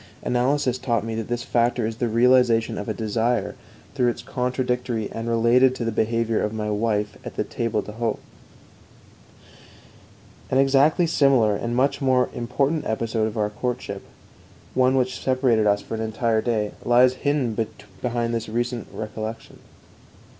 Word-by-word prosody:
Analysis 130 +1 +1
taught 120 -4 0
me 115 - -3
that 110 -1 -3
this 120 0 -2
factor 120 -1 +1
is 110 0 -4
the 120 - 0
realization 120 0 +3
of 105 - -5
a - - +1
desire 115 +1 0 0.4
through 125 -3 +1
its 120 - -2
contradictory 125 -3 -2
and 115 +1 -4
related 120 +3 +4
to 120 - -3
the 115 - 0
behavior 115 +1 0
of 105 - -1
my 105 -1 -3
wife 105 -1 -1
at - - -8
the - - 0
table 110 -3 -2
d'hôte. 110 +3 -3 2.3
An 130 - +1
exactly 135 +5 +4
similar 135 -9 +3
and 120 +3 -3
much 135 +3 +1
more 130 -2 +2
important 135 +6 -1
episode 110 0 -1
of 110 +1 -6
our 105 -1 0
courtship, 105 -3 -4 0.7
one 130 +1 +3
which 130 -1 0
separated 125 -5 +2
us 100 0 +2
for - - -8
an 110 - -2
entire 110 0 0
day, 110 -3 -1
lies 125 +1 +5
hidden 140 -6 0 0.5
behind 120 -1 -1
this 115 -1 -3
recent 120 0 -2
recollection. 110 +1 -6
120 Hz, 155 wpm, -23 LUFS, 110-125 Hz, 2.3 s, lies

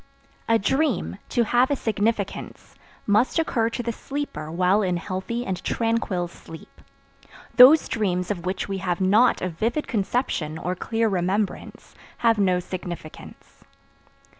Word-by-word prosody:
A 230 - +5
dream, 265 - 0
to 240 - +2
have 245 +3 +2
a 285 - +1
significance, 215 -3 -3 0.3
must 215 +9 +2
occur 235 -8 +1
to 245 +1 -4
the 235 - -1
sleeper 270 - -5
while 185 +4 +2
in 180 -3 0
healthy 190 +7 -4
and 190 -2 -4
tranquil 225 -6 -1
sleep. 165 -1 -14 0.8
Those 270 +5 +8
dreams 180 -4 -1
of 175 -4 -4
which 185 +1 -3
we 195 -1 -3
have 180 -2 -2
not 205 +6 +3
a 185 - 0
vivid 230 - -2
conception, 195 - -1
or 180 +2 -2
clear 225 +5 -1
remembrance, 195 +1 -2 0.2
have 230 -2 +2
no 185 -2 +3
significance. 175 -3 -9
205 Hz, 140 wpm, -24 LUFS, 180-235 Hz, 0.8 s, Those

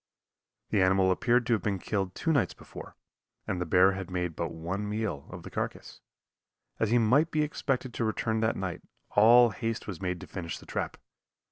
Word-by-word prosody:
The 100 - +3
animal 95 0 +4
appeared 120 +5 +2
to 120 - +2
have 110 - +1
been 100 +1 -1
killed 95 -1 -2
two 165 - 0
nights 140 - +1
before, - - -11 0.5
and 90 - -2
the 90 - -2
bear 90 +3 +5
had 95 -1 -5
made 90 -3 -2
but 85 -1 -2
one 95 +6 -4
meal 105 -10 -3
off - - -8
the - - -9
carcass. - - -5 0.8
As 110 - +1
he 120 - +4
might 130 +8 +4
be 155 -2 +1
expected 135 -4 -2
to - - -2
return 110 0 0
that 110 0 +1
night, 95 -3 -4 0.3
all 120 +3 +7
haste 115 0 -3
was 95 -4 -7
made 90 -1 -2
to - - -7
finish 85 -2 -6
the - - -14
trap. - - -3
105 Hz, 200 wpm, -29 LUFS, 90-115 Hz, 0.8 s, all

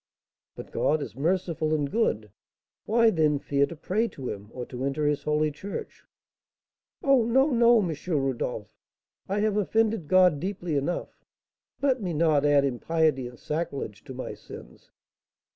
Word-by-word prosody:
"But - - -10
God 155 - +1
is - - -9
merciful 160 0 0
and 145 -2 -2
good; 110 - 0 0.5
why, 230 +1 +4
then, 155 -4 +2
fear 140 0 +1
to 170 - -8
pray 210 +8 0
to 135 - -7
him, 105 0 -7
or 125 -1 -6
to 125 +1 -6
enter 140 +2 -1
his 145 -1 +1
holy 150 0 +1
church?" 195 +7 -7 1.0
"Oh, 270 -4 +4
no, 265 +6 +3
no, 235 -4 +5
M. 160 - -2
Rodolph! 130 - -2 0.6
I 200 +2 0
have 210 -1 +1
offended 220 -3 +1
God 180 -4 +5
deeply 180 -3 -3
enough; 145 +5 -3 0.6
let 265 -3 +2
me 180 -4 -2
not 155 -2 +3
add 145 -1 +4
impiety 140 0 0
and 120 0 -12
sacrilege 140 -9 -4
to 130 -3 -8
my 130 - -5
sins." - - -13
155 Hz, 155 wpm, -27 LUFS, 140-200 Hz, 1.0 s, no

